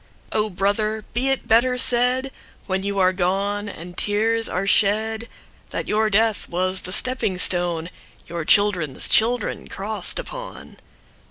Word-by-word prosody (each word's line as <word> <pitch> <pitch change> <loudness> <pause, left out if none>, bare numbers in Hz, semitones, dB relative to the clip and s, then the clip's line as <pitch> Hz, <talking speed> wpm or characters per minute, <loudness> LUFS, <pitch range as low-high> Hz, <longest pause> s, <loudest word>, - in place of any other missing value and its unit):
O 215 0 0
Brother! 210 +3 -1
be 255 +3 0
it 270 - -1
better 245 +3 +3
said, 250 +2 +3 0.3
When 190 -1 -2
you 200 0 -3
are 185 -1 +3
gone 200 +3 -1
and 175 -1 -10
tears 225 +3 0
are 185 +2 -2
shed, 220 +3 +1 0.4
That - - -4
your 215 +1 +1
death 220 +1 +1
was 185 +2 -1
the 185 - -7
stepping 255 -3 +1
stoneYour 170 -2 -1
children's 185 -9 +2
children 230 0 +1
cross'd 200 -1 -1
upon. - - -8
205 Hz, 135 wpm, -22 LUFS, 185-225 Hz, 0.4 s, better